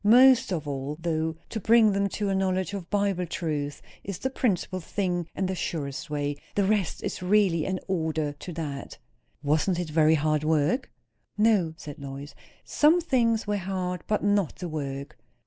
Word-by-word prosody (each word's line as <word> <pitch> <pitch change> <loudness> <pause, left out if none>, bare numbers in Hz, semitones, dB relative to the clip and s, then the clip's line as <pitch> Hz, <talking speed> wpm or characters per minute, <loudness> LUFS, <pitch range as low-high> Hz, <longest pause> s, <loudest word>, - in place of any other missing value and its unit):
Most 250 +2 +6
of 160 -5 -2
all, 140 +1 -3
though, 160 -1 -1
to 220 - -3
bring 225 0 +5
them 200 0 +1
to 205 +1 -2
a - - +1
knowledge 190 -1 0
of 190 -4 -5
Bible 200 -3 0
truth 150 -4 -3 0.2
is 195 -3 -5
the 265 - -2
principal 190 -7 0
thing 175 -1 -2
and 190 - 0
the 190 - -1
surest 155 -2 -4
way. 145 -1 -2 0.2
The 205 - +3
rest 200 -3 0
is - - -3
really 185 -4 +3
in 190 -1 -1
order 160 -5 -1
to 170 +5 -8
that." 145 -4 -5 0.5
"Wasn't 155 +5 +2
it 175 -3 -3
very 155 0 +5
hard 155 0 +1
work?" 160 - +1 0.5
"No," 210 -7 +3
said 145 -3 -9
Lois. 140 +1 -7 0.3
"Some 310 +4 +4
things 235 -9 +1
were 205 -1 0
hard; 185 -2 -3
but 210 - 0
not 205 -4 +2
the 180 - -5
work." 140 -2 -5
180 Hz, 175 wpm, -27 LUFS, 155-205 Hz, 0.5 s, Most